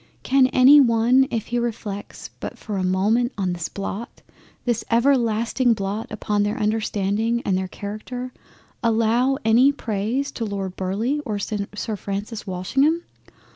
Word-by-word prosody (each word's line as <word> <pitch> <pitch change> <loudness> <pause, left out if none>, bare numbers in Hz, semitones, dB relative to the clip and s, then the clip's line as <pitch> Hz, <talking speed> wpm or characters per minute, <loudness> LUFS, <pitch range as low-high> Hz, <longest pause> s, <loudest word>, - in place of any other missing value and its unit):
Can 265 0 +4
any 260 +3 +7
one 245 +2 +4
if 225 -3 -2
he 240 0 0
reflects 220 -4 -5
but - - -6
for 210 -3 -5
a 185 - -1
moment 210 +7 +1
on 185 -3 0
this 170 -1 -4
blot, 200 +3 -6 0.4
this 240 -2 0
everlasting 235 -1 +2
blot 200 +2 -3
upon 210 -1 -1
their 205 +3 0
understanding 215 +1 0
and 190 - +1
their 185 0 -1
Character, 230 +6 -6 0.5
allow 230 +3 +2
any 240 +5 +5
praise 235 +2 -2
to 230 - -5
Lord 195 -3 -4
Burleigh 220 +10 -1
or 215 -7 -3
Sir 210 +1 -4
Francis 205 +2 -5
Walsingham? 270 - +1
225 Hz, 140 wpm, -23 LUFS, 200-245 Hz, 0.5 s, any